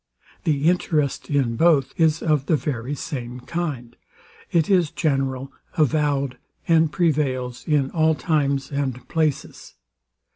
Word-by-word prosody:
The 150 -1 +1
interest 155 -5 0
in 135 -6 +1
both 155 -4 +3
is 160 -1 +2
of 150 -4 +1
the 160 - +4
very 140 -2 -3
same 125 -5 -5
kind: 130 -7 -4 0.6
It 165 -3 +2
is 180 -6 +3
general, 135 -3 -1 0.3
avowed, 145 -3 +1 0.3
and 160 -2 +4
prevails 135 -8 -1
in 145 -4 +1
all 160 -1 +2
times 140 -1 0
and 135 -3 -3
places. 155 -4 -2
145 Hz, 120 wpm, -23 LUFS, 135-160 Hz, 0.6 s, the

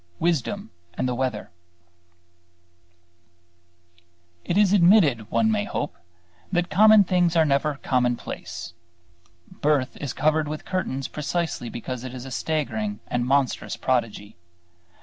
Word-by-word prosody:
WISDOM 160 -9 -1 0.2
AND 130 - -1
THE 125 - -1
WEATHER 125 -3 -3 2.9
It 175 - -1
is 205 -2 +4
admitted, 170 - +4
one 220 -1 +2
may 210 -1 0
hope, 145 - -4 0.6
that 175 -1 0
common 215 +1 +7
things 180 -2 +1
are 160 -1 +5
never 145 +1 +1
commonplace. 125 -8 -2 0.8
Birth 145 -3 0
is 140 -5 -4
covered 155 +1 +1
with 155 +1 -6
curtains 160 -8 -2
precisely 155 -4 -3
because 120 +1 -6
it 130 0 -7
is 125 0 -7
a 135 - -8
staggering 110 -10 -2
and 125 0 -1
monstrous 135 -1 0
prodigy. 115 -5 -2
145 Hz, 120 wpm, -24 LUFS, 125-175 Hz, 2.9 s, common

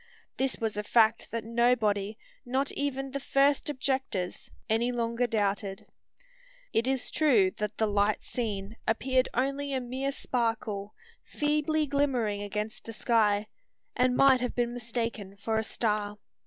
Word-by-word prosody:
This 265 0 0
was 220 -2 -2
a - - +1
fact 220 +1 +3
that 230 -1 -3
nobody 220 -3 +1 0.3
not 265 +3 0
even 270 -1 -2
the 280 - -3
first 275 +1 +2
objectors 265 -9 -2 0.2
any 230 +3 +2
longer 235 0 0
doubted. 200 -3 -1 0.9
It 230 +3 +2
is 265 -1 -1
true 235 -12 +4
that 210 0 -3
the 220 - +2
light 205 0 +1
seen 210 -3 -4
appeared 255 +3 +2
only 275 +2 0
a 265 - +1
mere 260 +2 -2
sparkle, 225 -6 -2 0.3
feebly 300 +1 0
glimmering 260 -8 0
against 210 +2 -4
the 225 - -7
sky, 210 -3 +2 0.5
and 250 0 +2
might 270 -2 +6
have 250 - -2
been 240 -1 0
mistaken 230 -4 -4
for 220 +2 0
a - - -1
star. 210 -2 -1
235 Hz, 140 wpm, -29 LUFS, 210-265 Hz, 0.9 s, might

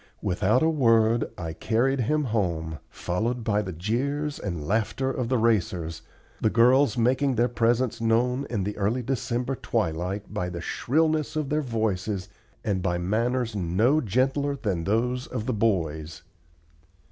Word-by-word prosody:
Without 105 - +2
a - - +4
word 115 -6 +3
I 80 -2 -4
carried 120 +9 +1
him 150 +6 +1
home, 85 - -1
followed 115 +7 -2
by 105 -1 +1
the 95 -3 -5
jeers 135 - -2
and 85 -7 -4
laughter 115 +5 0
of 125 -3 -2
the 130 - +2
racers, 90 -8 0 0.4
the 110 - +3
girls 125 +5 +4
making 130 +3 +2
their 120 +2 +3
presence 120 0 +1
known 125 +4 +1
in 105 -5 -1
the 105 +2 -3
early 110 +5 0
December 125 0 -1
twilight 95 -3 -2
by 90 - -2
the 85 -1 -5
shrillness 155 - 0
of 155 -3 -1
their 150 +1 +1
voices 110 -6 -2 0.3
and 100 -3 0
by 85 -1 0
manners 115 +5 0
no 105 - +2
gentler 135 +5 +1
than 100 -11 -2
those 125 +5 0
of 120 -4 -4
the 130 - 0
boys. 80 -8 -1
115 Hz, 150 wpm, -26 LUFS, 95-130 Hz, 0.4 s, a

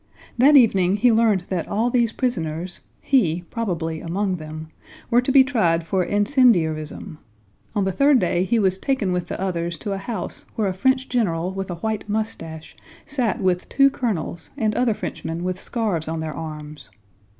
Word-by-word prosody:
That 285 +4 +7
evening 195 -7 +4
he 235 +4 +4
learned 220 -5 +3
that 180 -4 -2
all 230 +4 0
these 235 -2 +2
prisoners 175 -8 -2 0.2
(he, 180 - +2
probably, 170 -8 -3
among 185 +2 -1
them) 155 0 -8 0.4
were 240 +1 +5
to 250 - -1
be 270 0 +7
tried 175 -11 +1
for 185 +2 +1
incendiarism. 175 - +1 0.6
On 205 - +2
the 190 - 0
third 280 +8 +4
day 180 -4 +1
he 210 +5 +1
was 190 -3 +1
taken 260 -8 0
with 180 -1 -2
the - - -5
others 170 -2 -2
to 200 - -5
a 195 - -3
house 220 +3 -5
where 215 -3 0
a 190 - -1
French 260 +7 +1
general 180 -8 0
with 195 0 -4
a 175 - -3
white 215 +4 -3
mustache 165 -7 -4 0.3
sat 250 -7 -1
with 180 -1 0
two 275 0 +4
colonels 210 - -3
and 215 -1 +1
other 235 -1 +1
Frenchmen 165 -3 -5
with 185 0 -3
scarves 205 -10 -2
on 160 0 -3
their 160 -1 -4
arms. 150 -4 -8
190 Hz, 175 wpm, -22 LUFS, 165-230 Hz, 0.6 s, That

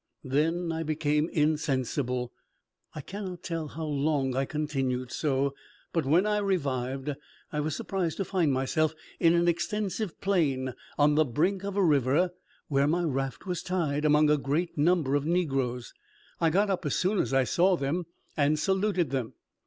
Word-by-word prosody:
Then 165 +5 0
I 165 0 -2
became 155 0 0
insensible. 130 -5 0 0.6
I 155 - -5
cannot 185 +2 -7
tell 165 -3 -3
how 160 +2 -6
long 140 -3 0
I 135 +1 +1
continued 135 -5 -2
so; 140 -2 0 0.4
but 165 -5 0
when 170 +7 +4
I 210 0 +1
revived, 135 -8 -1 0.4
I 150 - -1
was 150 0 -1
surprised 180 -3 -2
to 195 - -1
find 175 -7 +1
myself 145 +4 +1 0.2
in 165 0 +5
an 170 0 +3
extensive 190 +3 -1
plain 140 -10 +1 0.2
on 150 0 +4
the 155 +1 +4
brink 175 +9 0
of 200 0 -4
a 200 - +4
river, 150 +4 +3 0.4
where 140 -1 +2
my 175 +3 +1
raft 135 -4 -2
was 180 -2 -2
tied, 155 -5 -1
among 150 0 +4
a 150 - +3
great 150 +6 -1
number 155 -2 +2
of 145 +1 +1
negroes. 135 -8 -1 0.5
I 165 - +3
got 200 +5 +2
up 185 -1 -1
as 145 - -1
soon 190 +2 +1
as - - 0
I 135 0 +4
saw 180 +8 +3
them, 160 +5 -2 0.3
and 150 +1 +2
saluted 190 -3 +1
them. 130 -5 -2
155 Hz, 170 wpm, -28 LUFS, 135-175 Hz, 0.6 s, in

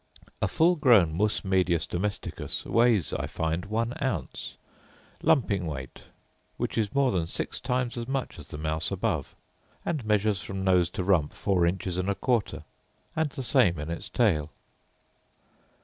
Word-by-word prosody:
A - - +3
full 170 +2 +3
grown 110 - +5
mus 105 +3 0
medius 90 -4 +2
domesticus 95 +4 -4
weighs, 115 -6 +3
I - - -2
find, 80 +3 -2
one 115 +3 -1
ounce, 130 -2 -3 0.6
lumping 100 - +2
weight, 65 -4 -7 0.5
which - - -2
is 110 -1 -1
more 140 -2 +3
than 85 -3 0
six - - -3
times 125 -1 -1
as 115 - -5
much 135 -9 -3
as 75 - -11
the - - -7
mouse 80 +1 -2
above; - - -2 0.5
and 155 -7 -1
measures 105 -2 +1
from 95 +1 -5
nose 90 -2 +3
to 90 - 0
rump 90 -6 +2
four 90 -4 +1
inches 90 0 -2
and 95 +1 -1
a 100 - +1
quarter, 120 -3 0 0.5
and 155 -1 +1
the 135 - -6
same 115 - +3
in 75 +2 -4
its 85 - -5
tail. 80 -11 +2
100 Hz, 160 wpm, -28 LUFS, 85-120 Hz, 0.6 s, grown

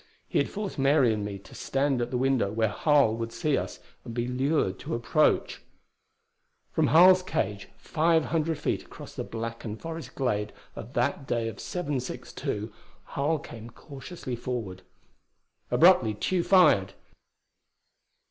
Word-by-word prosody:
He - - +1
had - - 0
forced 205 -6 -5
Mary 135 -4 +4
and 105 -1 -3
me 100 -1 -4
to 95 - -16
stand 135 -2 0
at 120 - -2
the 125 - -1
window 130 -5 +1
where 110 0 +1
Harl 140 -2 +3
would 115 0 -4
see 150 +2 0
us - - -4 0.2
and 115 - -8
be 120 0 -1
lured 130 -5 0
to - - -4
approach. 120 +6 +1 1.1
From - - +2
Harl's 185 +3 +7
cage, 105 - -3
five 160 0 +1
hundred 160 -1 0
feet 150 - -1
across - - -12
the - - -4
blackened 115 -1 -6
forest 165 0 -7
glade 105 -6 -1 0.2
of 120 +5 -9
that 135 +3 -1
day 115 -1 0
of 110 -3 -6
762, 130 - -4 0.4
Harl 150 +3 +1
came 115 -5 -10
cautiously 135 +1 -8
forward. 115 -7 -5 0.9
Abruptly 160 - +5
Tugh 175 - 0
fired. 100 - +5
125 Hz, 145 wpm, -27 LUFS, 115-155 Hz, 1.1 s, Harl's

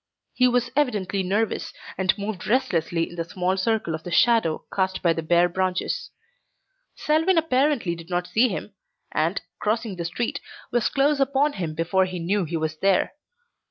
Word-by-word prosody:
He 255 - +4
was 245 0 +1
evidently 210 -9 +1
nervous 205 +4 -1 0.2
and 190 +1 +1
moved 200 -3 -5
restlessly 170 -8 +1
in 175 - -12
the 165 - -1
small 180 +2 -1
circle 200 -3 0
of 160 - -4
the 175 - -7
shadow 200 -3 +3
cast 190 -1 0
by 170 -2 +4
the 165 - -3
bare 175 +2 +4
branches. 185 +1 -2 0.9
Selwyn 325 +4 +2
apparently 275 - +2
did 165 +1 -11
not 175 0 -1
see 230 +7 +3
him, - - -5 0.4
and, - - 0 0.2
crossing 215 -2 -1
the 170 - -3
street, 235 +11 -2 0.3
was 240 -2 +2
close 280 +1 +2
upon 280 +2 +2
him 165 -5 -4
before 175 +4 +2
he 185 -1 -5
knew 180 +3 0
he 165 +1 -3
was 155 0 -2
there. 195 +2 +2
190 Hz, 170 wpm, -24 LUFS, 175-245 Hz, 0.9 s, He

